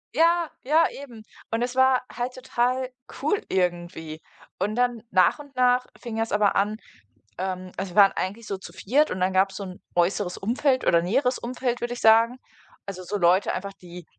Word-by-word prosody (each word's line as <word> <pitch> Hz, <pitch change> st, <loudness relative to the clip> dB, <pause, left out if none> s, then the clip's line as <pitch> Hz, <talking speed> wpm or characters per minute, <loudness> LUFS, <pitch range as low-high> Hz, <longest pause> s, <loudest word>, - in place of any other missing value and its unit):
Ja, 335 Hz, +1 st, +3 dB
ja, 315 Hz, +5 st, +4 dB, 0.2 s
eben. 230 Hz, -5 st, -12 dB, 0.3 s
Und 225 Hz, +1 st, 0 dB
es 250 Hz, +1 st, -2 dB
war 260 Hz, -1 st, +4 dB
halt 245 Hz, +1 st, -3 dB
total 255 Hz, 0 st, -1 dB, 0.3 s
cool 310 Hz, +8 st, 0 dB
irgendwie. 175 Hz, -3 st, -2 dB, 0.4 s
Und 205 Hz, +4 st, -1 dB
dann, 245 Hz, -2 st, 0 dB
nach 185 Hz, +7 st, +4 dB
und 285 Hz, -2 st, -13 dB
nach 250 Hz, 0 st, +3 dB
fing 235 Hz, -3 st, -6 dB
das 225 Hz, 0 st, -1 dB
aber 205 Hz, -1 st, +2 dB
an, 210 Hz, +2 st, +1 dB, 0.6 s
ähm 185 Hz, 0 st, -4 dB
also, 190 Hz, 0 st, -4 dB
wir -, -, -7 dB
waren 195 Hz, -, +3 dB
eigentlich 210 Hz, +4 st, -4 dB
so 195 Hz, -, -3 dB
zu -, -, -11 dB
4. 285 Hz, +9 st, +1 dB
und 185 Hz, -, -3 dB
dann 185 Hz, +1 st, +1 dB
gab's 190 Hz, 0 st, +2 dB
so 200 Hz, -, -5 dB
'n 185 Hz, -1 st, -9 dB
äußeres 180 Hz, +1 st, +1 dB
Umfeld 255 Hz, +5 st, 0 dB
oder 170 Hz, 0 st, +5 dB
näheres 250 Hz, +8 st, +1 dB
Umfeld, 245 Hz, 0 st, -3 dB
würde 240 Hz, 0 st, -2 dB
ich 245 Hz, -, -7 dB
sagen. 230 Hz, +3 st, +5 dB, 0.5 s
Also, 185 Hz, -2 st, -7 dB
so 205 Hz, +3 st, -3 dB
Leute 180 Hz, +2 st, +3 dB
einfach, 195 Hz, +1 st, -5 dB
die 175 Hz, -2 st, -12 dB
220 Hz, 190 wpm, -25 LUFS, 185-250 Hz, 0.6 s, oder